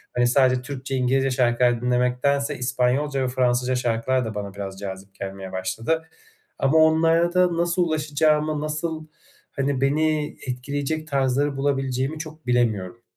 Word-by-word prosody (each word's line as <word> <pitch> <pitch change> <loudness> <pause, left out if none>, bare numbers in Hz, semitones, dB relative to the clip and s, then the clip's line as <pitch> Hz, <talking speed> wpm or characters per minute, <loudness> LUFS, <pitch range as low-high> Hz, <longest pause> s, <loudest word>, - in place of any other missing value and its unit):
hani, 120 0 +3
sadece 130 0 +3
Türkçe, 135 0 -5
İngilizce 130 +1 +1
şarkılar 120 -1 +2
dinlemektense 125 +4 +1
İspanyolca 130 +3 0
ve - - 0
Fransızca 125 0 +1
şarkılar 125 +1 0
da 110 -1 -5
bana 100 -1 -5
biraz 95 -1 -6
cazip 95 0 -8
gelmeye 95 -1 -7
başladı. 115 +12 -2 0.6
Ama 135 +4 +3
onlara 165 +2 +4
da 180 -2 +3
nasıl 175 +1 +1
ulaşacağımı, 155 -1 +1
nasıl, 155 +1 -3 0.4
hani, 135 -1 -1
beni 150 +2 +1
etkileyecek 145 +5 -3
tarzları 140 0 0
bulabileceğimi 135 +1 -1
çok 155 -2 -9
bilemiyorum. 115 -3 0
135 Hz, 130 wpm, -23 LUFS, 125-150 Hz, 0.6 s, onlara